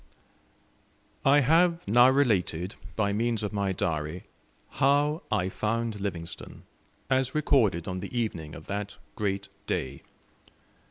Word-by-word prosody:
I 140 Hz, +2 st, +5 dB
have 165 Hz, -, +3 dB
now 120 Hz, +5 st, +6 dB
related, 100 Hz, -, +1 dB, 0.2 s
by 100 Hz, -2 st, +1 dB
means 115 Hz, +1 st, 0 dB
of 105 Hz, -, -3 dB
my 100 Hz, -2 st, 0 dB
Diary, 80 Hz, -1 st, -2 dB, 0.5 s
"How 145 Hz, +3 st, +2 dB
I 100 Hz, -4 st, +1 dB
found 110 Hz, +2 st, -2 dB
Livingstone," 85 Hz, -4 st, -6 dB, 0.4 s
as 130 Hz, +1 st, +1 dB
recorded 115 Hz, -, +2 dB
on 95 Hz, 0 st, -3 dB
the -, -, -6 dB
evening 80 Hz, -9 st, -3 dB
of 80 Hz, -, -11 dB
that 100 Hz, 0 st, -4 dB, 0.2 s
great 100 Hz, -2 st, -2 dB, 0.2 s
day. 65 Hz, +1 st, -3 dB
105 Hz, 120 wpm, -28 LUFS, 90-130 Hz, 0.5 s, now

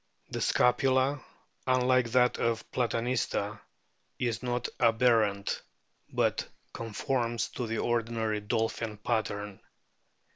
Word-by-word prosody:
The -, -, -3 dB
scapula, 130 Hz, +2 st, +3 dB, 0.4 s
unlike 130 Hz, -1 st, +3 dB
that 125 Hz, -1 st, +4 dB
of 115 Hz, -1 st, 0 dB
Platanista, 115 Hz, -3 st, -1 dB, 0.6 s
is 120 Hz, -3 st, -1 dB
not 125 Hz, -1 st, -1 dB
aberrant, 115 Hz, -4 st, +3 dB, 0.5 s
but -, -, 0 dB, 0.3 s
conforms 115 Hz, +1 st, -1 dB
to 120 Hz, -, -4 dB
the 115 Hz, 0 st, -2 dB
ordinary 115 Hz, -2 st, 0 dB
dolphin 110 Hz, +1 st, -1 dB
pattern. 105 Hz, -2 st, -2 dB
115 Hz, 95 wpm, -30 LUFS, 110-125 Hz, 0.6 s, that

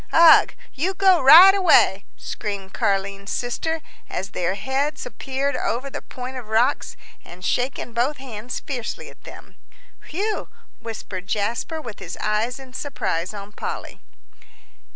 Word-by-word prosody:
"Ugh 330 Hz, -1 st, +7 dB, 0.2 s
you 360 Hz, +8 st, -1 dB
go 380 Hz, -2 st, +4 dB
right 335 Hz, +8 st, +10 dB
away!" 330 Hz, -, +4 dB
screamed 200 Hz, -2 st, -6 dB
Car'line's 200 Hz, 0 st, -1 dB
sister, 320 Hz, +7 st, -2 dB, 0.3 s
as 195 Hz, -, -4 dB
their 180 Hz, +1 st, -1 dB
heads 265 Hz, +8 st, -2 dB
appeared 265 Hz, +4 st, -3 dB
over 255 Hz, +4 st, -2 dB
the -, -, -5 dB
point 255 Hz, +1 st, -7 dB
of 245 Hz, -4 st, -8 dB
rocks, 230 Hz, +6 st, +1 dB, 0.3 s
and 180 Hz, +1 st, -11 dB
shaking 245 Hz, -1 st, -1 dB
both 255 Hz, +6 st, 0 dB
hands 245 Hz, -3 st, -6 dB
fiercely 250 Hz, -5 st, -5 dB
at -, -, -21 dB
them. -, -, -13 dB, 0.5 s
"Whew!" 415 Hz, +6 st, -2 dB, 0.3 s
whistled 200 Hz, -5 st, -7 dB
Jasper, 230 Hz, +11 st, -2 dB
with 235 Hz, -8 st, -8 dB
his 175 Hz, -, -7 dB
eyes 215 Hz, +3 st, -1 dB
in 265 Hz, -2 st, -12 dB
surprise 185 Hz, -, -3 dB
on 205 Hz, -1 st, -9 dB
Polly. -, -, -6 dB
245 Hz, 135 wpm, -23 LUFS, 205-285 Hz, 0.5 s, right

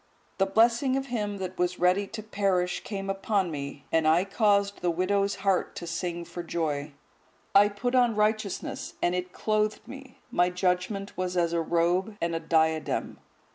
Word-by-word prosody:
The 195 Hz, -, +3 dB
blessing 235 Hz, +6 st, +3 dB
of 270 Hz, -, -2 dB
him 210 Hz, -5 st, -3 dB
that 185 Hz, -1 st, -6 dB
was 180 Hz, 0 st, 0 dB
ready 185 Hz, +3 st, +2 dB
to 215 Hz, +1 st, -7 dB
perish 195 Hz, -4 st, 0 dB
came 195 Hz, -2 st, -5 dB
upon 195 Hz, -2 st, 0 dB
me, 140 Hz, -1 st, -6 dB
and 160 Hz, -1 st, +3 dB
I 165 Hz, +4 st, +4 dB
caused 200 Hz, -1 st, +2 dB
the 175 Hz, -, +1 dB
widow's 195 Hz, +4 st, +1 dB
heart 195 Hz, -2 st, +1 dB
to 175 Hz, -, -6 dB
sing 170 Hz, 0 st, -3 dB
for 175 Hz, -, -6 dB
joy. 155 Hz, -4 st, -2 dB, 0.6 s
I 200 Hz, +1 st, +7 dB
put 230 Hz, +5 st, -3 dB
on 245 Hz, -3 st, +4 dB
righteousness, 215 Hz, -1 st, -1 dB
and 175 Hz, -, +2 dB
it 180 Hz, 0 st, -3 dB
clothed 215 Hz, +2 st, -1 dB
me; 270 Hz, 0 st, -11 dB
my 180 Hz, 0 st, +3 dB
judgement 180 Hz, +2 st, -1 dB
was 180 Hz, 0 st, -2 dB
as 170 Hz, -1 st, +1 dB
a 170 Hz, -, +1 dB
robe 175 Hz, +5 st, +1 dB
and 170 Hz, 0 st, -1 dB
a 165 Hz, -, -1 dB
diadem. 160 Hz, -1 st, 0 dB
190 Hz, 175 wpm, -27 LUFS, 175-210 Hz, 0.6 s, I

